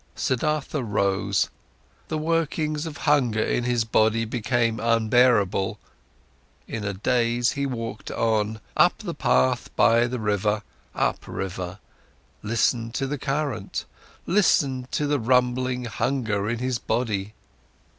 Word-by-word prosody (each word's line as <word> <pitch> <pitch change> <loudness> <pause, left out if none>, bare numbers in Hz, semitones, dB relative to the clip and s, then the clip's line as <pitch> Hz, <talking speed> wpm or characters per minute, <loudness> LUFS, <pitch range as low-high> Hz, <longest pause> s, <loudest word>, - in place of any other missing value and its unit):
Siddhartha 150 +3 -1
rose, 100 -3 0 0.6
the 155 - -2
workings 155 -1 -1
of 155 -1 -7
hunger 130 -7 +3
in 120 - 0
his 120 -2 +1
body 110 0 +2
became 120 0 0
unbearable. 115 -4 +3 0.9
In 110 - -4
a 100 - -1
daze 120 +4 +1
he 140 -1 -2
walked 115 -4 -5
on, 110 -1 0
up - - +4
the - - -5
path 65 +1 +1
by 115 +1 +4
the 125 +1 -3
bank, 105 -1 0 0.3
upriver, 95 0 -3 0.6
listened 115 +2 0
to 135 - 0
the 140 +1 -3
current, 135 -7 -2 0.4
listened 140 -9 +2
to 150 - +1
the 145 -1 +1
rumbling 125 +1 +1
hunger 110 -2 -1
in 120 - -1
his 125 0 -1
body. 110 -3 -2
120 Hz, 120 wpm, -25 LUFS, 110-130 Hz, 0.9 s, up